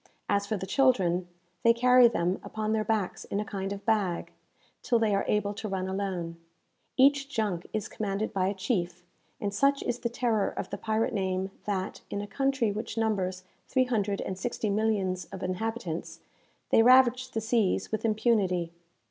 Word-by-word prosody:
As 200 0 +1
for 215 - -1
the 190 - -5
children, 190 -9 +2 0.3
they 230 - +6
carry 250 +1 +6
them 180 -4 0
upon 215 0 -3
their 220 -1 +1
backs 215 -3 -1
in 200 - -2
a 210 - -2
kind 195 -1 -4
of 200 0 -6
bag, 205 -6 0 0.5
till 240 - +2
they 220 -2 +2
are 195 - +1
able 210 -1 +1
to 205 +2 -5
run 190 -1 -2
alone. 190 -4 -3 0.6
Each 275 +1 +4
junk 210 -9 -2
is 215 -2 -2
commanded 210 +1 -3
by 190 -2 +1
a 200 - -1
chief, 180 -4 -2 0.3
and 200 -1 -2
such 275 +6 +2
is 245 0 -2
the 235 - -2
terror 235 -3 +1
of - - -6
the - - -3
pirate 220 +2 0
name, 190 -1 -1
that, 195 -2 -3
in 200 - -3
a 205 - -3
country 270 -1 0
which 220 +3 -5
numbers 190 -5 0 0.2
three 260 -1 +2
hundred 205 -5 -1
and 190 -1 -4
sixty 220 -1 -2
millions 200 -4 0
of 195 +1 -8
inhabitants, 185 -2 -4 0.5
they - - +6
ravage 255 +1 +5
the 225 - -2
seas 220 -3 +1
with 220 - -2
impunity. 210 -6 +1
210 Hz, 180 wpm, -28 LUFS, 190-230 Hz, 0.6 s, they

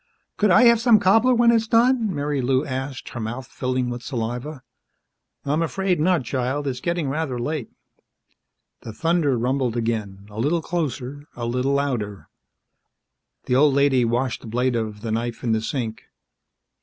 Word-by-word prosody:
"Could 210 - +2
I 180 - +6
have 235 -1 +6
some 230 -3 +6
cobbler 225 +6 +4
when 235 0 +5
it's 225 -1 +2
done?" 235 0 +3
Marilou 145 -3 0
asked, 130 0 -5
her 120 - -7
mouth 120 +4 -4
filling 125 0 -2
with 120 0 -5
saliva. 125 +3 -4 0.8
"I'm 150 +3 +1
afraid 185 +2 0
not, 170 -2 +2
child. 130 +3 -2
It's 130 -3 -2
getting 170 0 -1
rather 135 -2 -2
late." 135 +1 -3 1.1
The 110 - -8
thunder 160 0 +1
rumbled 125 0 0
again 105 -4 -3
a 105 - -8
little 160 +7 +1
closer, 145 -4 -3
a 120 - -4
little 125 +3 0
louder. 120 -8 -2 1.2
The - - -1
old 140 +1 +4
lady 140 -3 +3
washed 120 +2 -1
the - - -10
blade 125 +2 0
of 110 -2 -3
the 115 -1 -4
knife 115 +1 -3
in 120 - 0
the 110 0 +1
sink. 115 -1 -3
130 Hz, 160 wpm, -23 LUFS, 120-160 Hz, 1.2 s, I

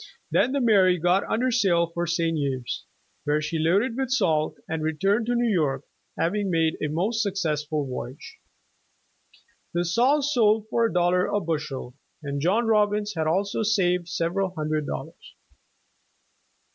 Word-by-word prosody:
Then 255 - +3
the 280 - +1
"Mary" 195 -6 +4
got 180 +3 +2
under 250 +3 +1
sail 190 -8 +3
for 175 0 -2
St. 165 -1 0
Ubes, 135 -5 -3 0.4
wher 150 +1 +2
j 155 - -4
she 160 +1 -2
loaded 200 +9 +2
with 265 -1 -2
salt 160 - +1
and 160 0 -3
returned 195 +9 0
to 245 - +1
New 240 0 +1
York, 145 -6 0 0.3
having 200 +4 0
made 165 -2 +1
a 150 - 0
most 195 +10 0
successful 155 -7 -1
voyage. 130 - -7 1.4
The 175 0 +1
salt 255 - +2
sold 220 -6 +2
for 235 - +2
a - - -5
dollar 180 +1 +2
a 205 - 0
bushel, 150 -7 -4 0.3
and 140 -1 -3
John 200 +9 +2
Robbins 210 -1 +1
had 160 -1 -1
also 195 +6 0
saved 180 -5 +1
sever 175 +2 -1
al 185 -1 -2
hundred 155 -1 -1
dollars. - - -7
180 Hz, 160 wpm, -25 LUFS, 155-210 Hz, 1.4 s, Mary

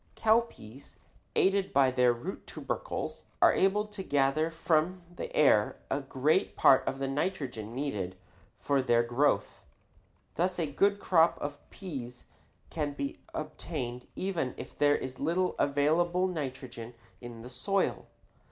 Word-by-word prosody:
Cowpeas, 220 - 0 0.4
aided 195 0 +2
by 135 -6 +4
their 125 -1 +4
root 140 +11 -6
tubercles, - - -4
are - - +6
able 205 +2 +2
to 210 -1 -8
gather 145 -1 +1
from 165 +2 0
the - - -6
air 120 -8 +4
a - - +1
great 140 +6 +1
part 135 - +6
of 135 - -1
the 135 0 -2
nitrogen 135 - -3
needed 105 -10 -3 0.4
for 140 -1 +1
their 120 -2 +3
growth. 120 +5 +1 0.7
Thus 180 +2 0
a 170 - 0
good 200 +8 +2
crop 170 -4 +4
of 145 0 -5
peas 130 -10 -8 0.5
can 150 -3 -2
be 140 -1 -4 0.2
obtained 150 -5 -5
even 175 -9 -2
if - - -9
there 145 0 +4
is 130 0 -7
little 175 +5 +1
available 165 +6 +2
nitrogen 130 -8 -5 0.3
in 120 -2 -9
the - - -8
soil. 195 +11 -1
145 Hz, 135 wpm, -30 LUFS, 130-180 Hz, 0.7 s, are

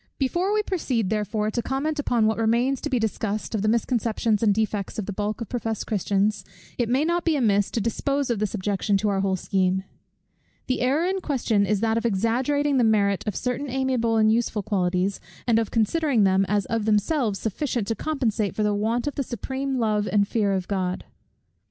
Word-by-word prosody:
Before 345 +9 0
we 425 0 +2
proceed, 255 - -1
therefore, 215 0 -1
to 235 - -1
comment 290 +5 -2
upon 240 -6 +2
what 220 +1 +1
remains 240 +4 +1
to 295 - -3
be 260 - +1
discussed, 215 -1 -2
of 215 - 0
the 215 - 0
misconceptions 225 -1 +1
and 220 -2 +4
defects 210 -1 -1
of 215 - -2
the 205 - -4
bulk 210 +3 -3
of 230 - -5
professed 225 -3 -3
Christians, 205 0 0 0.4
it 235 -2 +1
may 265 +5 +2
not 340 +1 0
be 330 -2 +2
amiss 205 -7 +2
to - - -2
dispose 275 +5 -1
of 230 - -1
this 215 0 -1
objection 200 0 0
to 210 +2 0
our 195 -1 0
whole 195 -1 +1
scheme. 190 0 0 0.8
The 255 - -1
error 275 +7 +2
in 380 +1 -1
question 230 - +1
is 210 -2 +1
that 225 0 +2
of 230 - -7
exaggerating 260 +7 +1
the 250 - +4
merit 200 -3 +2
of 210 - -1
certain 250 +3 -2
amiable 250 -3 0
and 215 0 +4
useful 225 -2 0
qualities, 185 -1 0 0.3
and 230 -2 +3
of 225 - -1
considering 240 +1 +2
them 190 0 +3
as 205 -2 +1
of 225 -1 -2
themselves 215 +1 +1
sufficient 230 +2 -2
to 225 - 0
compensate 225 -7 -1
for 215 - 0
the 210 0 +2
want 225 +4 0
of 290 - -2
the - - -2
supreme 265 +3 -3
love 215 -3 +1
and 200 -1 +3
fear 210 -2 +1
of 185 -2 -2
God. 185 -2 -2
220 Hz, 205 wpm, -24 LUFS, 205-255 Hz, 0.8 s, and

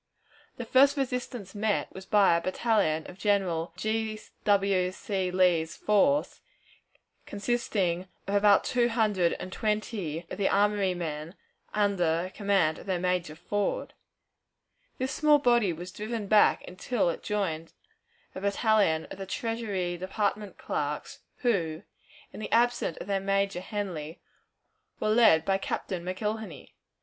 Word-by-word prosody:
The 240 - -5
first 275 +5 +5
resistance 250 -6 -3
met 210 -1 -1
was 190 0 -10
by 200 -5 +5
a 170 - +1
battalion 185 -5 +1
of 185 - -11
General 185 -5 0
G. 220 0 -2 0.3
W. 195 -3 +3
C. 190 -1 -2
Lee's 180 -3 +2
force, 275 +8 +2 0.9
consisting 200 -5 -1 0.2
of 195 - -3
about 205 0 +5
two 240 -1 +1
hundred 210 -7 +2
and 185 - -7
twenty 210 -7 -2
of - - -6
the 195 - +2
armory 200 -2 +2
men, 160 0 -5 0.4
under 185 -4 +1
command 195 -7 +1
of - - -13
their 185 -2 0
major, 180 -3 -1
Ford. 205 +5 -2 1.0
This 260 +1 -2
small 300 -1 +4
body 240 -8 +3
was 175 +3 -7
driven 215 +2 -4
back 210 +1 +4
until 185 +1 -1
it - - -7
joined 165 -6 -2 0.6
a 190 - -7
battalion 200 -5 +2
of - - -8
the 195 - -6
Treasury 205 -7 -2
Department 200 +2 -2
clerks, 145 0 -4 0.2
who, 175 -8 0 0.5
in - - -8
the 215 - -6
absence 240 -7 +2
of - - -7
their 200 -1 0
major, 195 -1 0
Henly, 185 -6 -5 0.8
were 215 - 0
led 215 -8 +5
by 195 0 +1
Captain 185 -2 -3
McIlhenney. 205 -2 -4
200 Hz, 135 wpm, -28 LUFS, 180-215 Hz, 1.0 s, first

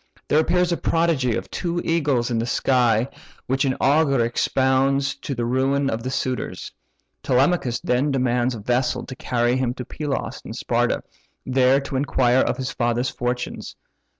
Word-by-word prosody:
There 150 - +3
appears 180 +2 +2
a 170 - +1
prodigy 160 -8 +1
of - - -5
two 175 0 -2
eagles 145 -7 +1
in 115 - 0
the 115 - -2
sky, 125 -3 +2 0.4
which 135 +2 0
an 130 -1 +1
augur 140 -4 +3
expounds 135 +3 +1
to 140 0 -5
the 120 0 -2
ruin 135 +3 +1
of 110 - -3
the 130 - -4
suitors. 130 -1 -3 0.5
Telemachus 130 -2 +1
then 125 +4 +1
demands 125 -2 +1
a - - -7
vessel 125 +4 0
to 130 - -8
carry 125 -3 0
him 125 -1 -1
to 125 - -6
Pylos 145 +2 -4
and - - -8
Sparta, - - 0 0.4
there 130 +1 +3
to 135 -1 -4
inquire 130 -2 +2
of - - 0
his 130 -1 -3
father's 120 +1 0
fortunes. 125 0 -4
130 Hz, 165 wpm, -22 LUFS, 125-140 Hz, 0.5 s, There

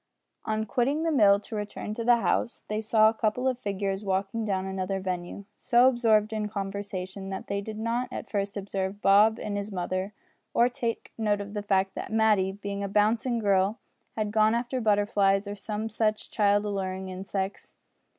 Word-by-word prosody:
On 220 0 -1
quitting 265 +8 0
the 330 - +1
mill 205 -8 +5
to 220 - -8
return 210 0 -4
to 230 - -4
the 240 +1 +6
house 235 0 -1
they 215 +1 -2
saw 220 0 +4
a 220 - +3
couple 230 +3 0
of 255 -2 0
figures 200 -2 -2
walking 195 +3 -1
down 190 -3 -1
another 190 0 -2
avenue, 185 0 -4
so 245 0 +4
absorbed 225 -4 +3
in 215 -1 -1
conversation 195 -1 -5
that 190 - -5
they 200 0 -2
did 215 +1 -7
not 230 +3 -1
at - - -6
first 200 0 -2
observe 195 0 -3
Bob 210 +3 +6
and 205 -1 -3
his 200 +1 -4
mother, 185 +1 -2 0.4
or 240 +1 +5
take 235 -2 -4
note 210 -2 +1
of 205 0 -7
the 210 - -2
fact 195 -1 +1
that - - -6
Matty, 215 -4 +3
being 200 0 -5
a - - -1
bouncing 220 +4 +2
girl, 200 0 +2 0.4
had 215 -1 -1
gone 215 +1 +4
after 245 +2 -2
butterflies 205 -2 +2
or 205 - -3
some 210 +1 -4
such 215 0 -1
child 205 -1 +2
alluring 190 -2 -3
insects. 190 +1 -5
205 Hz, 185 wpm, -27 LUFS, 195-220 Hz, 0.4 s, the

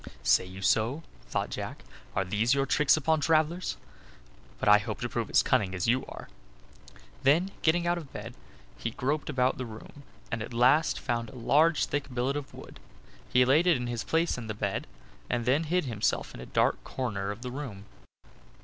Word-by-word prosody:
"Say - - +4
you 95 +1 -9
so?" 120 +11 +2 0.2
thought - - -2
Jack. - - -6 0.3
"Are 95 - +1
these 110 +7 +2
your 135 0 +1
tricks 150 +2 +3
upon 155 +1 +2
travelers? 160 +3 +1 0.8
But - - -2
I 105 0 +8
hope 100 - -5
to - - -2
prove - - -3
as - - +4
cunning 95 -2 +1
as 90 - -1
you 125 +3 +1
are." - - -9 0.9
Then, 165 +8 +3
getting 170 +2 +2
out 175 0 +1
of 150 -5 -11
bed, - - -7 0.5
he - - -2
groped 140 +7 -2
about 130 -3 +1
the 130 - -3
room, 110 +6 -11 0.3
and 115 -2 -2
at 115 +2 -6
last 130 +7 +4
found 115 -3 -2
a - - -13
large 150 +6 +3
thick 140 -2 -3
billet 125 +3 -1
of 145 -2 -5
wood. - - -12 0.5
He 125 0 +5
laid 150 +7 +4
it 170 -5 +5
in 125 - -4
his 120 -1 -3
own - - -10
place 165 -4 +1
in 115 - -7
the 110 - -4
bed, 100 - -2 0.4
and 120 -1 -1
then 140 +6 +2
hid 180 +1 +1
himself 110 -5 -1
in - - -10
a 65 - -9
dark - - +1
corner 100 -7 -3
of 105 +4 -6
the 125 - -5
room. 120 -8 -7
125 Hz, 200 wpm, -29 LUFS, 110-150 Hz, 0.9 s, I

